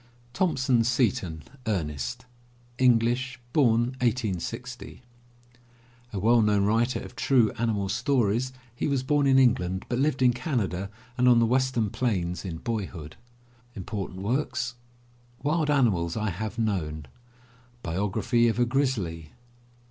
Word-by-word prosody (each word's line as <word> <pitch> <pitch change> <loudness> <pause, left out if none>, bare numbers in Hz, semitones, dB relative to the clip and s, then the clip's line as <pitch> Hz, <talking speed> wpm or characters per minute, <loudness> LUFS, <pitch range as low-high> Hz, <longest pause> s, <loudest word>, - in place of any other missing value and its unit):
THOMPSON 130 -8 +2
SETON, 115 - 0 0.2
ERNEST 75 - -3 0.5
(English, 125 +1 +2
I860 120 - 0 0.6
) 120 0 -30
A - - -3
well 115 +4 +4
known 105 -2 +3
writer 115 +5 +1
of - - -10
true 125 -6 +3
animal 110 -4 0
stories. 120 +1 +1 0.2
He - - -1
was 140 -3 0
bom 145 +1 +2
in 135 -1 +5
England 95 -8 +2
but 120 - -1
lived 135 -2 +1
in 125 -1 +5
Canada 110 - -2 0.3
and 125 - +4
on 120 - +6
the 115 - +4
western 125 -3 +1
plains 90 -8 -1
in 85 -4 -5
boyhood. 95 -7 -5 2.3
Wild 155 +1 +1
Animals 105 - +2
I 110 -2 -1
Have 105 +4 -5
Known. 85 -10 -2 0.8
Biography 105 +7 +1
of 115 - 0
a 120 - +3
Grizzly. 110 - -1
115 Hz, 120 wpm, -27 LUFS, 100-130 Hz, 2.3 s, on